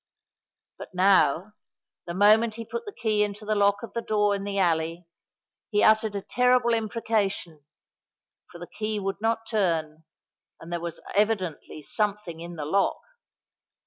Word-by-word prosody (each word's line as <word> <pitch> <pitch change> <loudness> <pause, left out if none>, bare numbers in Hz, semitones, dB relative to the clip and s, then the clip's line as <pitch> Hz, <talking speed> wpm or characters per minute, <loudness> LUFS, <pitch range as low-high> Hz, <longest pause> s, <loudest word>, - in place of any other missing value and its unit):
But - - -10
now, 185 0 +3 0.5
the 170 - -4
moment 215 +3 +4
he 230 0 -7
put 235 - -6
the - - -4
key 220 - 0
into 205 +1 -5
the 215 - 0
lock 200 0 +2
of 215 -4 -8
the 235 - -2
door 210 -2 +1
in 200 0 -3
the 200 0 -3
alley, 165 -1 0 0.6
he 210 -1 +2
uttered 220 -1 +4
a 200 - -3
terrible 250 0 +3
imprecation—for 215 -7 -1 1.0
the 175 - -8
key 215 +3 -3
would 195 +1 -4
not 225 0 0
turn, 165 -8 -1 0.6
and 170 +1 -8
there 170 - -1
was 170 -1 -6
evidently 195 -7 -1
something 205 -3 -2
in 170 +1 -8
the 150 -3 -5
lock! 195 +6 +1
205 Hz, 150 wpm, -26 LUFS, 175-220 Hz, 1.0 s, moment